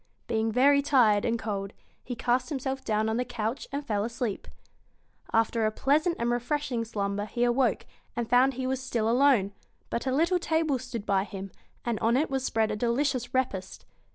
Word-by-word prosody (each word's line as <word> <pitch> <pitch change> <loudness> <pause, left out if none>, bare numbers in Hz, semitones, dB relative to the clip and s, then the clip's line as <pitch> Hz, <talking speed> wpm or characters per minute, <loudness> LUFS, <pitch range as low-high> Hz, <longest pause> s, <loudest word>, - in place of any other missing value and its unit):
Being 220 0 0
very 280 +4 +5
tired 235 -8 +4
and 235 0 +1
cold, 200 -3 -4 0.3
he 245 - -5
cast 245 +3 0
himself 265 -2 -3
down 215 -2 0
on 220 +1 0
the 250 - +1
couch 240 0 -4
and 285 +1 -4
fell 205 -4 0
asleep. 230 -2 -3 0.8
After 225 0 +2
a 215 - +3
pleasant 305 +9 +2
and 235 0 0
refreshing 245 0 -1
slumber 205 -2 -2
he 240 +3 -2
awoke, 245 -1 +2 0.3
and 240 -1 -2
found 250 +2 +4
he 260 0 -3
was 260 0 -1
still 235 -4 -1
alone; 240 -5 +4 0.4
but 235 - -2
a - - +1
little 335 +7 +2
table 320 -5 +1
stood 235 -4 -6
by 195 -1 +2
him, 195 -2 -7 0.3
and 235 -3 -1
on 230 +2 +2
it 295 +1 0
was 265 -1 -1
spread 225 -4 +1
a - - -1
delicious 245 +2 0
repast. 205 -8 -2
240 Hz, 185 wpm, -28 LUFS, 220-265 Hz, 0.8 s, very